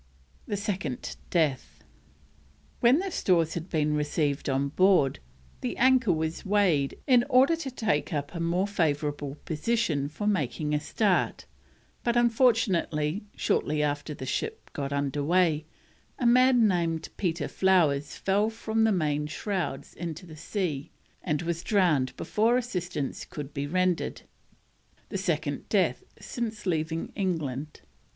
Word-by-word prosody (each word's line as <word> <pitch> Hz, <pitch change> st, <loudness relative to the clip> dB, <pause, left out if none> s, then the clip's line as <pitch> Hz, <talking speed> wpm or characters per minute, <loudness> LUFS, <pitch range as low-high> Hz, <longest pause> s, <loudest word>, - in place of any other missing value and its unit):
THE 205 Hz, -, -2 dB
SECOND 190 Hz, -, -3 dB
DEATH. 155 Hz, -7 st, 0 dB, 1.0 s
When 240 Hz, +4 st, +5 dB
the 380 Hz, +2 st, -2 dB
stores 170 Hz, -, +2 dB
had 170 Hz, +2 st, -5 dB
been 150 Hz, -2 st, +1 dB
received 150 Hz, -1 st, 0 dB
on 135 Hz, +1 st, +1 dB
board, 180 Hz, -4 st, +3 dB, 0.4 s
the 250 Hz, -, -3 dB
anchor 255 Hz, -4 st, +4 dB
was 160 Hz, 0 st, -2 dB
weighed 190 Hz, -9 st, +2 dB
in 250 Hz, -3 st, +5 dB
order 265 Hz, +5 st, +5 dB
to 305 Hz, -5 st, -4 dB
take 215 Hz, -, -1 dB
up 145 Hz, -1 st, -3 dB
a 170 Hz, -, -5 dB
more 170 Hz, +3 st, +1 dB
favourable 150 Hz, -6 st, -1 dB
position 160 Hz, -4 st, 0 dB
for 185 Hz, +7 st, -5 dB
making 150 Hz, -6 st, 0 dB
a 150 Hz, -, +2 dB
start, 195 Hz, +5 st, 0 dB, 0.6 s
but, 240 Hz, 0 st, +1 dB
unfortunately, 210 Hz, -, +2 dB
shortly 150 Hz, 0 st, 0 dB
after 145 Hz, +1 st, -2 dB
the 130 Hz, -, -7 dB
ship 130 Hz, -, -4 dB
got 140 Hz, -1 st, -3 dB
underway, 150 Hz, +3 st, +1 dB, 0.5 s
a 245 Hz, -, -2 dB
man 250 Hz, -1 st, +5 dB
named 165 Hz, -4 st, 0 dB
Peter 170 Hz, -5 st, -1 dB
Flowers 155 Hz, -7 st, +2 dB
fell 205 Hz, +3 st, +1 dB
from 225 Hz, 0 st, 0 dB
the 220 Hz, -, +3 dB
main 150 Hz, -5 st, 0 dB
shrouds 170 Hz, -2 st, -3 dB
into 170 Hz, +1 st, -6 dB
the 160 Hz, -3 st, -11 dB
sea 155 Hz, -4 st, -3 dB, 0.3 s
and 150 Hz, +2 st, -1 dB
was 170 Hz, 0 st, -2 dB
drowned 155 Hz, -11 st, +2 dB
before 230 Hz, +3 st, +2 dB
assistance 180 Hz, -, -3 dB
could 145 Hz, -1 st, -8 dB
be 140 Hz, 0 st, -3 dB
rendered: 185 Hz, +2 st, 0 dB, 0.9 s
the -, -, -3 dB
second -, -, -2 dB
death -, -, +1 dB, 0.2 s
since 225 Hz, -4 st, -5 dB
leaving 160 Hz, -2 st, -1 dB
England. 155 Hz, -, -3 dB
170 Hz, 135 wpm, -28 LUFS, 150-210 Hz, 1.0 s, When